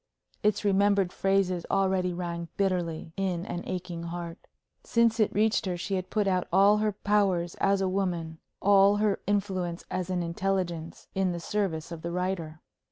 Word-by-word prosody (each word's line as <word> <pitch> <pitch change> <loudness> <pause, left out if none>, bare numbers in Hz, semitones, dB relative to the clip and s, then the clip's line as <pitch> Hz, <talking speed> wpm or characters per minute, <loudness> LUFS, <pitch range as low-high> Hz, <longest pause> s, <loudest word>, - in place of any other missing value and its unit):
Its 210 0 +1
remembered 200 -1 +3
phrases 195 -3 +1
already 190 -2 +1
rang 170 -1 -4
bitterly 175 -5 -1
in 185 -3 -1
an 175 - -4
aching 180 -2 -4
heart. 170 0 -6 0.4
Since 230 -1 +2
it 215 - +3
reached 215 -1 +2
her, 180 -1 -1
she 190 +3 -4
had 185 -1 -2
put 210 -2 +1
out 185 -2 +1
all 200 +3 +6
her 215 0 +1
powers 195 -4 +1
as 195 0 +3
a 190 - +1
woman, 175 -4 -2 0.2
all 200 0 +6
her 205 -1 +1
influence 190 -4 -1
as 185 0 -2
an 180 -1 0
intelligence, 170 -1 -2
in 190 -2 +1
the 170 - -4
service 170 -3 -2
of 165 -2 -6
the 170 - -4
writer. 175 -3 -3
185 Hz, 165 wpm, -28 LUFS, 175-200 Hz, 0.4 s, all